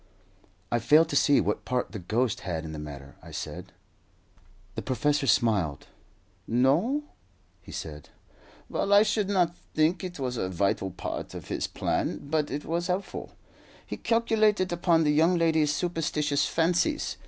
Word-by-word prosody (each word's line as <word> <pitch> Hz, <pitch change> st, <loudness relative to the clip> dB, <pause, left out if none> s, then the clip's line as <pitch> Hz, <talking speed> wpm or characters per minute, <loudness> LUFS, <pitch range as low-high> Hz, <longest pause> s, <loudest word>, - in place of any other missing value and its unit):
"I 120 Hz, -, +2 dB
fail 155 Hz, +8 st, +5 dB
to 150 Hz, -, -5 dB
see 145 Hz, 0 st, +5 dB
what -, -, -1 dB
part 125 Hz, -1 st, -2 dB
the 105 Hz, -, -6 dB
ghost 110 Hz, +6 st, 0 dB
had 80 Hz, -3 st, -4 dB
in 80 Hz, -, -6 dB
the 75 Hz, -, -6 dB
matter," 70 Hz, -2 st, -9 dB
I -, -, -12 dB
said. -, -, -6 dB, 1.0 s
The -, -, -4 dB
professor 145 Hz, +3 st, 0 dB
smiled. 100 Hz, -, +1 dB, 0.6 s
"No?" 155 Hz, -, +2 dB, 0.6 s
he -, -, -13 dB
said. -, -, -7 dB, 0.6 s
"Well, 200 Hz, -, 0 dB
I 205 Hz, +1 st, +8 dB
should 210 Hz, -2 st, 0 dB
not 175 Hz, -4 st, +2 dB, 0.2 s
think 160 Hz, +4 st, +2 dB
it 180 Hz, -1 st, -5 dB
was 125 Hz, -3 st, -3 dB
a 95 Hz, -, -1 dB
vital 95 Hz, +1 st, 0 dB
part 90 Hz, -, -6 dB
of -, -, -8 dB
his -, -, -1 dB
plan, -, -, -1 dB
but 155 Hz, -1 st, 0 dB
it 145 Hz, +2 st, -4 dB
was 170 Hz, +2 st, -1 dB
helpful. 185 Hz, +2 st, -3 dB, 0.5 s
He -, -, -5 dB
calculated 215 Hz, -5 st, +2 dB
upon 170 Hz, -1 st, +3 dB
the 150 Hz, -, +3 dB
young 165 Hz, +4 st, +4 dB
lady's 160 Hz, -3 st, +3 dB
superstitious 150 Hz, -3 st, 0 dB
fancies. 175 Hz, -, +1 dB
150 Hz, 155 wpm, -27 LUFS, 120-175 Hz, 1.0 s, I